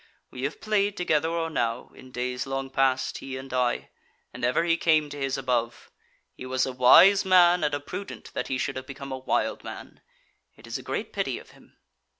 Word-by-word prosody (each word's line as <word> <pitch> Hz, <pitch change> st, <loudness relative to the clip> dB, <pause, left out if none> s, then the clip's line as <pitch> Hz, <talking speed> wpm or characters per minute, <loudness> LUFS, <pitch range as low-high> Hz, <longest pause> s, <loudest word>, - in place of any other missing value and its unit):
We 130 Hz, +1 st, -4 dB
have 145 Hz, -, -4 dB
played 205 Hz, -2 st, +1 dB
together 160 Hz, -3 st, +1 dB
or 165 Hz, -1 st, -2 dB
now, 115 Hz, -4 st, -2 dB
in 130 Hz, -, -14 dB
days 125 Hz, +1 st, -3 dB
long 135 Hz, 0 st, -3 dB
past, 135 Hz, -1 st, +1 dB
he 130 Hz, -1 st, -6 dB
and 130 Hz, 0 st, -9 dB
I; 125 Hz, -1 st, 0 dB, 0.4 s
and -, -, -9 dB
ever 125 Hz, +6 st, +2 dB
he 170 Hz, -1 st, +2 dB
came 155 Hz, -3 st, +2 dB
to 145 Hz, -, -7 dB
his 135 Hz, -1 st, -1 dB
above. 120 Hz, -3 st, -2 dB, 0.4 s
He 130 Hz, -, -9 dB
was 130 Hz, 0 st, +1 dB
a 130 Hz, -, -4 dB
wise 185 Hz, +11 st, +7 dB
man 180 Hz, -2 st, +5 dB
and 145 Hz, -1 st, +1 dB
a -, -, -3 dB
prudent 195 Hz, +7 st, -8 dB
that -, -, -3 dB
he 130 Hz, -, -1 dB
should 135 Hz, +1 st, -2 dB
have 130 Hz, 0 st, -7 dB
become 140 Hz, 0 st, -8 dB
a 130 Hz, -, -4 dB
wild 130 Hz, -, -1 dB
man. -, -, -10 dB, 0.5 s
It -, -, -16 dB
is -, -, -4 dB
great -, -, -4 dB
pity -, -, -2 dB
of -, -, -13 dB
him." -, -, -22 dB
135 Hz, 205 wpm, -26 LUFS, 130-165 Hz, 0.5 s, wise